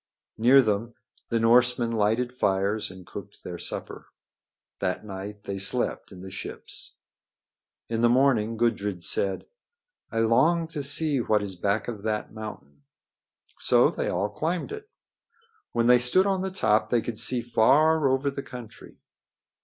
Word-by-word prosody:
Near 130 +4 +6
them 110 +2 -2 0.3
the 115 - +1
Norsemen 120 +1 +3
lighted 115 +3 0
fires 100 -2 0
and 95 -1 -12
cooked - - -10
their - - -7
supper. - - -6 0.7
That 90 +2 -2
night 100 +1 -8
they 100 0 -5
slept 120 +5 0
in 90 -2 -11
the 95 0 -9
ships. 90 - -7 0.9
In 115 0 -2
the 120 - +4
morning 120 -3 +2
Gudrid 105 -6 -1
said: 95 +3 0 0.7
"I 115 - 0
long 160 +10 +3
to 155 -3 -4
see 145 0 +1
what 105 -3 +1
is 95 -2 -5
back 100 +4 -1
of 110 -4 -5
that 105 0 -3
mountain." 105 -10 -9 0.8
So - - +4
they - - -3
all 100 +4 -1
climbed 170 - -3
it. 425 0 -8 0.8
When 115 - 0
they 125 +1 +6
stood 125 +11 +4
on 195 -2 0
the 190 - -2
top 110 - +1
they 120 -2 +2
could 115 -2 -5
see 120 +1 +1
far 145 +6 +3
over 135 +2 +1
the 140 - -5
country. 125 -4 -11
115 Hz, 155 wpm, -26 LUFS, 105-130 Hz, 0.9 s, Near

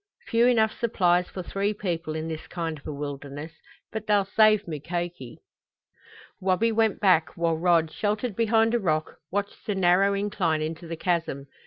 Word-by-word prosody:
Few 235 +1 +3
enough 220 -3 +3
supplies 180 -6 +2
for 185 - -6
three 200 +4 -1
people 170 -5 -3
in 160 0 -3
this 160 -1 -6
kind 165 -2 -3
of - - -13
a - - -3
wilderness 145 +1 -6 0.4
but 220 -1 -5
they'll 205 -2 +3
save 215 0 +4
Mukoki!" 170 -3 -5 1.0
Wabi 190 +5 +2
went 220 -1 +1
back, 180 -5 +3
while 170 -1 +1
Rod, 165 -1 +2
sheltered 210 +1 -2
behind 225 0 +3
a 240 - +3
rock, 155 -6 -1
watched 200 +1 -4
the 205 - 0
narrow 190 +2 +3
incline 195 -6 0
into 165 +2 -5
the 165 0 -5
chasm. 165 -6 -1
180 Hz, 165 wpm, -26 LUFS, 160-210 Hz, 1.0 s, save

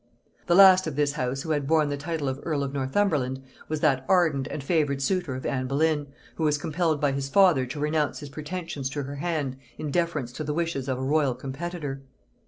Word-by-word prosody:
The 175 - +4
last 185 -2 +8
of 155 - -4
this 145 0 +2
house 135 -1 -2
who 160 - -3
had 145 -3 0
borne 155 -1 +3
the 145 - -1
title 150 0 -3
of 130 0 -2
earl 150 -4 -1
of 135 -1 -4
Northumberland 135 -2 0 0.3
was 155 -1 -2
that 135 -4 +2
ardent 160 -8 +3
and 145 - -5
favored 145 -3 +1
suitor 175 -2 -1
of 130 - -6
Anne 130 -2 -1
Boleyn, 145 +1 +1 0.3
who 160 - -2
was 150 -1 +3
compelled 155 0 0
by 145 -1 +2
his 135 0 -3
father 160 -6 +4
to 135 +4 -6
renounce 150 0 0
his 145 - -8
pretensions 150 -2 -5
to 145 +1 -3
her 140 +1 -6
hand 145 -4 -2 0.2
in 150 -2 -4
deference 155 -7 -1
to 155 - -5
the 150 0 -2
wishes 165 -6 -2
of 130 - 0
a 130 - -4
royal 140 -2 +2
competitor. 140 +2 -5
145 Hz, 215 wpm, -26 LUFS, 135-160 Hz, 0.3 s, last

